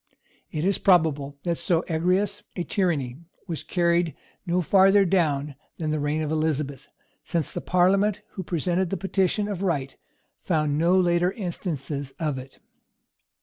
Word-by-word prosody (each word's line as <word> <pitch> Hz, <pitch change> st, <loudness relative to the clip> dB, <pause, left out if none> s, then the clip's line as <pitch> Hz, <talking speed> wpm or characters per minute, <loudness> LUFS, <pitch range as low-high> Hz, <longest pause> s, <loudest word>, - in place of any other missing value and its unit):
It 155 Hz, +2 st, -2 dB
is 195 Hz, 0 st, +2 dB
probable 150 Hz, -6 st, +2 dB
that 170 Hz, -2 st, -1 dB
so 170 Hz, -1 st, +1 dB
egregious 185 Hz, +5 st, 0 dB
a 175 Hz, -, -2 dB
tyranny 155 Hz, -11 st, -1 dB, 0.3 s
was 165 Hz, -4 st, -3 dB
carried 170 Hz, -3 st, +1 dB, 0.3 s
no 175 Hz, +1 st, +2 dB
farther 195 Hz, +3 st, +5 dB
down 150 Hz, -6 st, +1 dB, 0.2 s
than 155 Hz, -2 st, -2 dB
the 155 Hz, -, 0 dB
reign 150 Hz, +2 st, 0 dB
of 150 Hz, -, -3 dB
Elizabeth; 150 Hz, -3 st, -1 dB, 0.3 s
since 170 Hz, -4 st, -1 dB
the -, -, -4 dB
parliament 195 Hz, +3 st, +2 dB
who 190 Hz, -, -6 dB
presented 180 Hz, +1 st, -1 dB
the 195 Hz, -, -2 dB
petition 195 Hz, +2 st, 0 dB
of 200 Hz, -3 st, -4 dB
right 145 Hz, -8 st, -1 dB, 0.5 s
found 150 Hz, -4 st, 0 dB
no 175 Hz, +3 st, +4 dB
later 175 Hz, 0 st, +2 dB
instances 150 Hz, -, -4 dB
of 150 Hz, -5 st, -1 dB
it. 130 Hz, +1 st, -12 dB
170 Hz, 145 wpm, -25 LUFS, 150-185 Hz, 0.5 s, farther